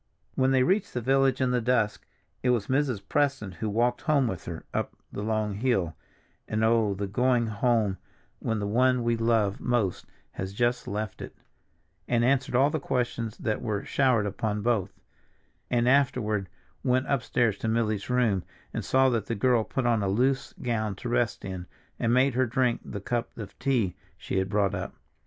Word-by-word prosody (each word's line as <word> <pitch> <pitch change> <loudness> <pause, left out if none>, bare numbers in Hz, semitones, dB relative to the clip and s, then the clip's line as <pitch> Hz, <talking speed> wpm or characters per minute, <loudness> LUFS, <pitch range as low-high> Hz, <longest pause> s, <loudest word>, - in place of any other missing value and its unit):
When 130 0 +2
they 130 -1 +4
reached 190 +5 +1
the - - +1
village 135 +1 +2
in 130 -1 +2
the 125 -1 +1
dusk 115 -3 0 0.3
it 125 - +1
was 120 -5 +2
Mrs. 130 -6 0
Preston 135 -9 0
who 105 +5 -4
walked 120 +4 +1
home 145 -5 +2
with 95 -6 -4
her 85 -1 -6
up - - -2 0.2
the - - -5
long 110 -1 -1
hill 100 -7 0 0.5
(and, 110 +1 -1
oh, 110 -3 +3
the 100 +1 -3
going 120 +4 +2
home 110 -3 +1 0.4
when 115 - -1
the 105 - -2
one 125 +4 +2
we 115 0 +2
love 115 -3 +1
most 120 -7 -1 0.2
has 95 +1 -5
just 120 +1 0
left 105 0 -4
it) - - -8 0.7
and 120 -1 +2
answered 130 -1 +1
all 135 +4 +4
the 155 - -1
questions 120 -4 -2
that 110 - -2
were 105 -4 -2
showered 125 -6 +2
upon 105 +1 -2
both, 110 -5 +1 0.8
and 120 0 +2
afterward 120 -8 +2 0.3
went 130 +1 +2
upstairs 120 -5 +1
to - - -3
Milly's 110 -2 0
room 115 -7 +2 0.3
and - - -3
saw 130 0 +3
that 115 -4 -1
the 115 - -1
girl 120 +1 +3
put 130 +3 -2
on 115 -3 +2
a 100 - 0
loose 130 +6 +1
gown 110 -4 -1
to 120 - -6
rest 120 -1 0
in, 95 -2 -6 0.3
and 115 - +1
made 130 +2 +4
her 130 +1 +2
drink 125 0 +1
the 100 - -6
cup 120 +3 -3
of 105 -3 -7
tea 125 -9 +1 0.2
she 95 - -2
had 95 0 -1
brought 100 -1 +1
up. 95 -1 -4
115 Hz, 185 wpm, -27 LUFS, 105-125 Hz, 0.8 s, they